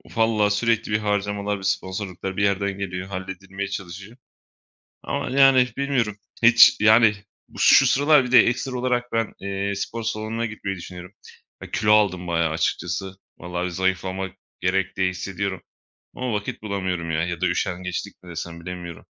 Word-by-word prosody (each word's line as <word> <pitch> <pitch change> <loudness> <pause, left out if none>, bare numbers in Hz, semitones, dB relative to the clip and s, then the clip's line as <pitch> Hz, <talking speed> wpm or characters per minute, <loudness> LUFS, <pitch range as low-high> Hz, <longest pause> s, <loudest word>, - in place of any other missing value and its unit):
Valla 110 -2 +2
sürekli 110 +1 0
bir 105 - +3
harcamalar 105 -1 -1
ve 95 - -11
sponsorluklar 95 -1 -3
bir 100 - +1
yerden 100 0 0
geliyor. 90 -1 -4
Halledilmeye 95 +1 -6
çalışıyor 95 +3 -8 0.9
ama, - - -3
yani, 135 -1 +5
bilmiyorum. 125 -7 0 0.3
Hiç, 120 0 +8
yani, 110 0 +6 0.3
bu - - -13
şu 135 - +7
sıralar 145 +2 +4
bir 125 - -5
de 125 - +8
ekstra 125 +2 -2
olarak 125 -1 -1
ben, 115 -2 0
eee, 100 0 -3
spor 115 +3 -4
salonuna 110 +1 -2
gitmeyi 100 -4 -5
düşünüyorum. 90 0 -10 0.5
Ya, - - -10
kilo 105 0 +3
aldım 95 -4 +2
bayağı 85 -1 +1
açıkçası. 90 +4 -2 0.2
Vallahi 90 +1 -4
zayıflamak 95 +1 -2 0.2
gerek, 95 +1 0
diye 95 -1 +2
hissediyorum 95 +1 -4 0.6
ama 125 -1 -3
vakit 105 0 -4
bulamıyorum, 95 -5 -3
ya. 80 0 0
Ya 85 -2 -4
da 95 - +2
üşengeçlik 90 +2 -3
mi 90 - -12
desem? 85 0 -6
Bilemiyorum. 85 -1 -8
100 Hz, 155 wpm, -23 LUFS, 90-110 Hz, 0.9 s, Hiç